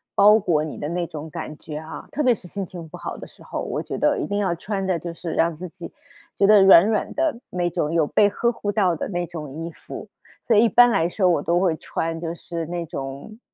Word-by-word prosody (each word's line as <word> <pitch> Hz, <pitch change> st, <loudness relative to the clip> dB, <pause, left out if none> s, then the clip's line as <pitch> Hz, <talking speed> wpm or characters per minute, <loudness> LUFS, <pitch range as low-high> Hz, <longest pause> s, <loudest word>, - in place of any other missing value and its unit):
包 210 Hz, +2 st, +7 dB
裹 170 Hz, -8 st, +1 dB
你 155 Hz, -, -7 dB
的 145 Hz, -, -4 dB
那 170 Hz, 0 st, -2 dB
种 160 Hz, -1 st, -7 dB
感 150 Hz, 0 st, -7 dB
觉 150 Hz, 0 st, -7 dB
啊， 160 Hz, +1 st, -8 dB
特 300 Hz, -, -2 dB
别 250 Hz, -4 st, +4 dB
是 190 Hz, -, -13 dB
心 195 Hz, +2 st, -4 dB
情 175 Hz, -2 st, -9 dB
不 -, -, -9 dB
好 -, -, -5 dB
的 -, -, -9 dB
时 -, -, -17 dB
候， -, -, -5 dB
我 -, -, -3 dB
觉 -, -, -5 dB
得 -, -, +2 dB
一 -, -, -2 dB
定 205 Hz, -, -2 dB
要 190 Hz, -4 st, +1 dB
穿 195 Hz, +3 st, -3 dB
的 185 Hz, -3 st, 0 dB
就 170 Hz, +1 st, -6 dB
是 170 Hz, 0 st, -6 dB
让 165 Hz, 0 st, +1 dB
自 180 Hz, +3 st, -7 dB
己 175 Hz, +1 st, -10 dB, 0.4 s
觉 200 Hz, -, +3 dB
得 210 Hz, 0 st, +7 dB
软 190 Hz, -2 st, +8 dB
软 215 Hz, 0 st, 0 dB
的， 310 Hz, -6 st, 0 dB
那 175 Hz, -1 st, -1 dB
种 150 Hz, -1 st, -2 dB
有 165 Hz, -2 st, +3 dB
被 205 Hz, -, +4 dB
呵 235 Hz, +4 st, 0 dB
护 210 Hz, -3 st, -5 dB
到 195 Hz, -4 st, +2 dB
的 -, -, -3 dB
那 175 Hz, -2 st, -2 dB
种 155 Hz, -5 st, -8 dB
衣 165 Hz, +3 st, -5 dB
服， -, -, -10 dB, 0.3 s
所 235 Hz, -, +1 dB
以 220 Hz, -, +6 dB
一 -, -, +5 dB
般 245 Hz, +5 st, +7 dB
来 170 Hz, -6 st, +2 dB
说 185 Hz, +1 st, +1 dB
我 175 Hz, -, +2 dB
都 175 Hz, +1 st, +1 dB
会 180 Hz, -4 st, +2 dB
穿 165 Hz, +1 st, -3 dB
就 165 Hz, 0 st, -4 dB
是 170 Hz, -1 st, -5 dB
那 170 Hz, +1 st, -4 dB
种， 140 Hz, +9 st, -7 dB
175 Hz, 280 characters per minute, -23 LUFS, 165-200 Hz, 0.4 s, 软